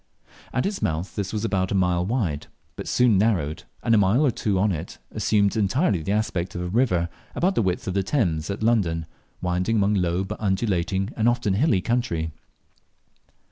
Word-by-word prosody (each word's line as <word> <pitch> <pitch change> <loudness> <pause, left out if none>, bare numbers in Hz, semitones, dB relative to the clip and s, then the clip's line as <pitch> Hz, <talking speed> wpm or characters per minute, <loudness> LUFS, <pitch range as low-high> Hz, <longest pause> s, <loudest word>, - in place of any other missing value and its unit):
At 130 - 0
its 200 0 -2
mouth 80 +4 -2
this 100 -3 -2
was 110 0 -2
about 95 -4 0
half - - -1
a - - +3
mile 90 -1 +2
wide, 95 - -1 0.3
but - - -7
soon 120 -6 +4
narrowed, 85 -9 0 0.2
and 115 - +3
a 110 - +6
mile 105 +9 +3
or 135 - +3
two 105 -3 -1
on 100 +2 +2
it 85 0 -5
assumed 100 -1 +2
entirely 105 - +1
the 80 - -3
aspect 100 -4 -1
of 90 - -3
a 90 - -3
river 90 -6 +2 0.3
about 185 +3 +2
the - - +1
width 95 -3 -1
of 95 - -1
the 100 - +1
Thames 90 - 0
at 100 +2 -3
London, 90 -8 +1 0.4
winding 90 +5 0
among 100 -1 +3
low 90 -1 +1
but 95 - -6
undulating 95 -1 0
and 115 +1 +3
often 120 -5 0
hilly 110 - +2
country. 85 -7 -1
100 Hz, 195 wpm, -24 LUFS, 90-115 Hz, 0.4 s, a